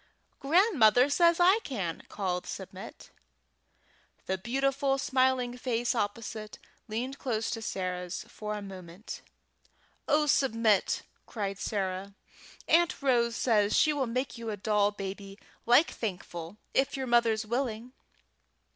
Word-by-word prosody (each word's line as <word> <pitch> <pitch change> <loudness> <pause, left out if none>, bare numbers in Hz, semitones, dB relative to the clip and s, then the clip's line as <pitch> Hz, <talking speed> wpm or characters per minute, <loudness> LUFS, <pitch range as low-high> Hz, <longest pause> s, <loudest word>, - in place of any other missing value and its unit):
"Grandmother 280 - +4
says 340 +2 +4
I 370 +5 +6
can!" 190 - -4
called 180 -3 -2
back - - -9
Submit. - - -9 1.1
The 190 0 -2
beautiful 270 +4 0
smiling 260 -2 +1
face 240 -1 0
opposite 215 -1 -4 0.3
leaned 245 +5 -4
close 225 -4 -1
to 225 - -3
Sarah's 180 -3 -4
for 210 0 -5
a 205 - -6
minute. 185 0 -9 0.9
"Oh, 300 0 +3
Submit!" 230 -7 +2 0.2
cried 200 -3 -4
Sarah, 195 -1 -3 0.5
"Aunt 340 0 +3
Rose 235 -3 +2
says 215 -4 +2
she 305 - +4
will 275 -3 -1
make 255 +1 -3
you 230 -1 -5
a 210 - -3
doll 205 0 +2
baby 195 -1 -7 0.3
like 245 +7 +5
Thankful, 180 -3 -5 0.2
if 275 +1 +1
your 265 - -2
mother's 235 -3 +2
willing!" 240 0 -3
230 Hz, 125 wpm, -29 LUFS, 205-265 Hz, 1.1 s, I